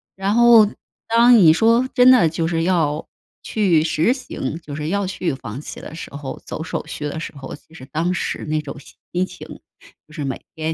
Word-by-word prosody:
“然 195 +3 -1
后， 235 -3 +7 0.4
当 235 +2 +6
你 160 -4 +7
说 230 +8 +3
真 250 -1 +6
的 180 -11 +5
就 165 +1 -2
是 165 -1 -1
要 160 -4 0 0.4
去 180 -8 +2
实 165 +8 +1
行 255 - -6
就 145 -3 -8
是 150 +1 -4
要 200 +1 0
去 180 -4 -2
放 125 -1 -7
弃 - - -9
的 - - -10
时 - - -8
候， 140 -2 -7
走 160 - -5
手 - - -5
续 150 - -7
的 150 +2 -4
时 160 - -7
候， 135 -1 -8
其 - - -22
实 130 -5 -11
当 165 +6 -1
时 - - -3
那 155 0 -1
种 145 -1 -8
心 180 +5 -5
情 - - -11 0.6
就 155 - -18
是 155 - -5
每 135 -1 -4
天 160 0 -2
165 Hz, 225 characters per minute, -20 LUFS, 150-210 Hz, 0.6 s, 后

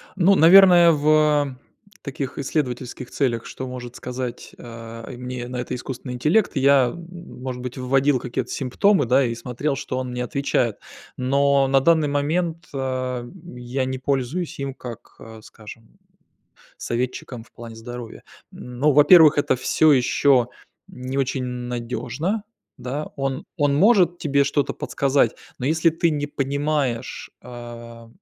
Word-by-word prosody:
Ну, 195 +1 +4
наверное, 175 0 +7
в 150 -2 +2 0.5
таких 140 -1 -5
исследовательских 130 -4 -3
целях, 120 -5 -1
что 130 - -7
может 125 -1 -8
сказать, 125 -1 -6
э, 115 0 -9
мне 125 -1 -6
на 125 - -6
это 125 - -4
искусственный 125 0 -6
интеллект, 155 - +1
я, 135 -2 +4
может 165 -8 -8
быть, 125 0 -6
вводил 135 +1 +2
какие-то 125 0 -4
симптомы, 145 +5 +1
да, 130 +3 +3
и 115 -1 -2
смотрел, 125 +5 -3
что 130 - -5
он 125 - -4
мне 125 0 -3
отвечает. 125 -5 -1 0.4
Но 140 +1 +2
на 135 0 +4
данный 160 +1 +3
момент, 160 +4 -1
ам, 130 +4 -5
я 125 +2 -3
не 130 0 -4
пользуюсь 140 +6 -2
им 140 -1 -4
как, 120 -4 -10
а, 110 -1 -12
скажем, 110 +1 -14 0.8
советчиком 120 0 -4
в - - -27
плане 115 -2 -10
здоровья. 120 0 -9 0.3
Ну, 125 +4 -1
во-первых, 155 +1 +7
это 145 - +2
всё 155 +4 +3
ещё 125 -1 +3 0.4
не 130 +2 -5
очень 135 -1 -1
надёжно, 125 - -4 0.3
да, 130 +4 -5
он 135 +1 -3
он 145 -2 +2
может 180 -2 +4
тебе 140 -2 +1
что-то 140 0 0
подсказать, 140 0 0 0.2
но 130 - -3
если 160 +2 +3
ты 165 +1 0
не 145 -1 -2
понимаешь, 140 -3 -2
а, 120 -1 -10
130 Hz, 140 wpm, -22 LUFS, 125-150 Hz, 0.8 s, наверное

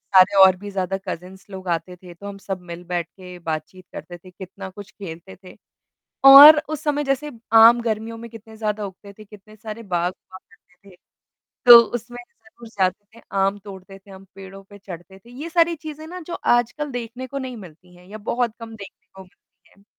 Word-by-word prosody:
सारे 190 +2 +6
और 190 -1 +6
भी 205 +2 -9
ज़्यादा 190 0 -2
कज़िन्स 185 +2 -8
लोग 190 -1 -10
आते 170 +2 -3
थे 180 0 -14
तो 200 +4 -11
हम 200 0 -8
सब 195 -1 -6
मिल 170 +1 -8
बैठ 175 -1 -3
के 180 0 -13
बातचीत 165 +3 -6
करते 175 - -9
थे 185 +2 -17
कितना 190 +1 -10
कुछ 200 +2 -12
खेलते 190 -3 -10
थे। 185 - -14 0.7
और 290 +3 +11
उस 310 -1 -5
समय 295 -1 -1
जैसे 275 +2 -2 0.2
आम 230 +2 +7
गर्मियों 225 0 -4
में 230 +1 -10
कितने 225 -1 -13
ज़्यादा 210 -1 -3
उगते 200 +1 -12
थे 215 - -15
कितने 210 +1 -17
सारे 220 +1 -9
बाग 175 -2 -2
हुआ 185 0 -16
करते 195 0 -24
थे, 185 - -18 0.7
तो 240 -1 +12
उसमें 240 +1 -6 0.6
जाते 185 +1 0
थे 230 - -16 0.2
आम 195 +1 +1
तोड़ते 195 -1 -12
थे, 195 +1 -21
हम 190 0 -13
पेड़ों 195 0 -12
पे 205 +1 -16
चढ़ते 190 0 -12
थे। 230 +5 -20
ये 280 +7 -8
सारी 335 0 +2
चीज़ें 310 0 -10
ना 360 +3 -9
जो 345 - -6
आजकल 240 +5 0
देखने 245 +1 -6
को 275 +2 -6
नहीं 260 -2 -7
मिलती 180 -2 -15
हैं 180 0 -19
या 215 +2 -9
बहुत 240 -2 0
कम 225 -1 -9
देखने 200 -2 -13
को 190 - -12
मिलती 180 - -27
हैं। 200 - -26
200 Hz, 205 wpm, -21 LUFS, 185-235 Hz, 0.7 s, तो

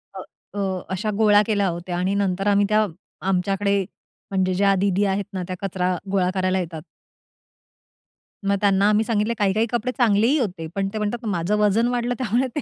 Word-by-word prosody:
अ, - - -6 0.4
अ, 190 -2 -1
अशा 210 +3 -2
गोळा 210 -2 +5
केल्या 205 -3 +1
होत्या 175 +1 -4
आणि 185 +2 0
नंतर 195 0 0
आम्ही 205 0 +4
त्या 215 0 +3 0.4
आमच्याकडे 195 +2 +1 0.5
म्हणजे 185 -1 +1
ज्या 195 +1 +3
दीदी 195 +1 +1
आहेत 195 +1 0
ना, 185 -1 -3
त्या 185 - -4
कचरा 185 -1 -1 0.2
गोळा 185 -2 +2
करायला 185 0 +1
येतात 165 -3 -5 1.6
मग 200 0 +2
त्यांना 200 0 +3
आम्ही 215 +1 +3
सांगितलं 220 0 0
काही-काही 210 +2 +2
कपडे 240 +1 -1
चांगलेही 235 +3 +3
होते, 180 -8 -3
पण 195 -1 0
ते - - -3
म्हणतात, 215 +3 -3
"माझं 190 0 0
वजन 210 +3 +3
वाढलं." 245 0 -1
त्यामुळे 250 +2 +1
ते - - 0
200 Hz, 175 wpm, -23 LUFS, 185-215 Hz, 1.6 s, गोळा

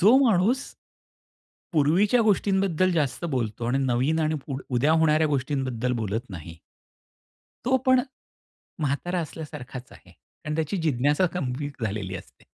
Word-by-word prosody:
जो 215 +8 +7
माणूस 225 +5 +3 1.1
पूर्वीच्या 175 +10 +3
गोष्टींबद्दल 190 -3 +2
जास्त 150 0 -1
बोलतो 115 -1 -2
आणि 125 +3 +1
नवीन 130 +6 +1
आणि 155 0 +1
पुढ 135 -2 -4
उद्या 135 +6 +3
होणाऱ्या 160 -1 +4
गोष्टींबद्दल 130 -3 -1
बोलत 110 +3 -3
नाही. 85 -2 -9 1.1
तो 260 +2 +3
पण 260 0 +6 0.8
म्हातारा 165 +5 -1
असल्यासारखाच 145 -5 -8
आहे - - -17
कारण 155 0 -9
त्याची 160 +4 -1
जिज्ञासा 145 +3 +2
गंभीर 140 -4 -3
झालेली 100 -2 -3
असते. - - -14
150 Hz, 125 wpm, -26 LUFS, 125-175 Hz, 1.1 s, जो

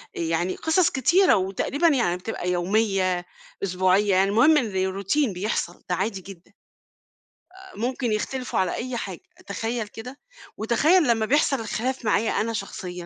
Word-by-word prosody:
يعني 170 +2 -1
قصص 325 +2 +2
كتيرة، 345 +8 +4
وتقريبًا 195 - 0
يعني 235 - +2
بتبقى 180 -1 -4
يوميّة، 185 -1 0 0.4
أسبوعيّة، 185 +2 +2
يعني 195 +1 +3
المهم 255 +10 +5
إن 200 -8 0
روتين 200 +6 0
بيحصل 180 -2 -3
ده 180 - +1
عادي 195 +1 -2
جدًا، 185 -2 -13 1.0
أ 380 0 -14
ممكن 245 +1 -2
يختلفوا 250 +4 -2
على 185 -1 0
أي 250 0 -4
حاجة 190 -6 -5 0.3
تخيّل 225 +3 -3
كده، 250 +6 -10 0.4
وتخيّل 295 - +3
لمّا 225 -2 +2
بيحصل 275 +1 +2
الخلاف 240 +3 -3
معايا 215 +1 +2
أنا 230 +2 -1
شخصيًا. 195 -3 -5
215 Hz, 140 wpm, -24 LUFS, 185-255 Hz, 1.0 s, المهم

